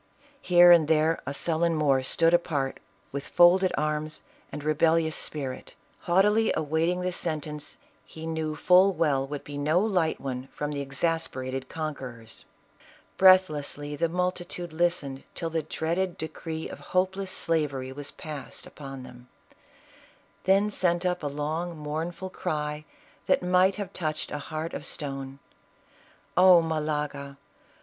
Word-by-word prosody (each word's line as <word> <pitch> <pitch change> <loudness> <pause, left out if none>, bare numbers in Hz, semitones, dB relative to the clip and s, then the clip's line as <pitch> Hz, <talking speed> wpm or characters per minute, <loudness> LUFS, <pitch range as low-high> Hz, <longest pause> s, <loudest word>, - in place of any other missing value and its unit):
Here 175 -1 +7
and 165 -3 +6
there 160 +1 +2
a 140 - -2
sullen 165 +2 +1
Moor 140 -4 +3
stood 165 +5 +2
apart 145 -6 0 0.3
with 140 +1 -5
folded 185 +2 +5
arms 155 0 -2 0.3
arid 150 - -6
rebellious 160 +1 +2
spirit, 135 -4 -2 0.2
haughtily 210 +4 +3
awaiting 160 +4 0
the 180 0 -1
sentence 150 -3 -4 0.3
he 160 0 -10
knew 160 -1 -2
full 185 +4 +5
well 140 -6 +1
would 145 0 -6
be 145 -1 -7
no 155 +4 +2
light 185 -6 +1
one 130 -1 -5
from 150 0 -4
the 145 -1 -3
exasper 140 -1 -1
ated 130 0 -5
conquerors. 130 -8 -6 0.7
Breathlessly 150 -6 +4
the 165 +3 0
multitude 175 -1 -3
listened 160 -5 0
till 165 -1 -3
the 165 0 0
dreaded 170 +4 -2
decree 160 0 -5
of - - -9
hopeless 190 +1 -1
slavery 145 -7 0
was 145 +1 -6
passed 150 -4 -8
upon 135 -2 -9
them; 125 -1 -13 1.2
then 195 +2 +3
sent 175 -2 +1
up 180 0 0
a 150 - -2
long, 155 +4 -3
mournful 165 +5 -4
cry 150 -4 -3 0.4
tl\at - - +3
might 185 +1 +3
have 200 -2 -6
touched 155 -3 -3
a 150 - -3
heart 155 +3 -5
of - - -5
stone. 135 -3 -5 1.0
"Oh 180 -1 +8
Malaga! 150 -3 -3
160 Hz, 140 wpm, -27 LUFS, 145-175 Hz, 1.2 s, Oh